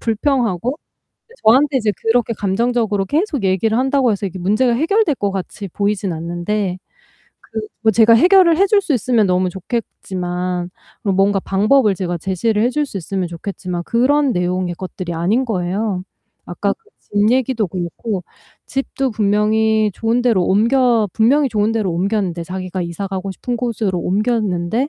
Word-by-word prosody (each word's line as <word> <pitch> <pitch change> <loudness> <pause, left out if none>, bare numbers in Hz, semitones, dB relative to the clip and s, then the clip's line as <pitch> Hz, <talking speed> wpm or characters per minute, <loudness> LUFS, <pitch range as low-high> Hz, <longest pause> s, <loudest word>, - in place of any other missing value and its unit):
불평하고 235 - 0 0.7
저한테 265 +5 +4
이제 220 -4 +1
그렇게 230 0 +1
감정적으로 210 0 0
계속 300 - -1
얘기를 195 +4 +1
한다고 265 -1 +2
해서 200 -1 -2
이게 190 -1 -5
문제가 215 +7 +2
해결될 330 - +2
것 200 -5 -1
같이 195 +1 -5
보이진 200 -1 -1
않는데 175 +4 -2 0.6
그 220 - -6 0.2
뭐 220 -1 +4
제가 225 +2 +6
해결을 350 +5 +5
해줄 400 +1 +4
수 320 -7 -1
있으면 235 -3 +2
너무 180 0 +1
좋겠지만 180 -3 -4 0.3
그런 200 -2 0
뭔가 195 0 +3
방법을 210 +4 +3
제가 175 -1 -3
제시를 195 +5 0
해줄 290 +5 +1
수 235 - -8
있으면 185 0 -3
좋겠지만 175 0 -5
그런 270 +3 +2
내용의 180 -1 -1
것들이 185 -1 -6
아닌 195 +10 +1
거예요. 190 -2 -2 0.4
아까 - - -1
그 450 -1 -13 0.2
집 205 +2 +1
얘기도 250 -4 +1
그렇고 180 +3 -4 0.4
집도 270 0 -2
분명히 215 +1 +2
좋은 230 +2 0
데로 230 -7 +3
옮겨 230 +2 +3
분명히 270 +6 +3
좋은 210 0 +1
데로 215 -5 -1
옮겼는데 185 -1 -1
자기가 185 +1 -5
이사 170 +3 -4
가고 195 0 -4
싶은 240 +5 -4
곳으로 220 -6 -1
옮겼는데 210 - 0
210 Hz, 350 characters per minute, -18 LUFS, 185-245 Hz, 0.7 s, 제가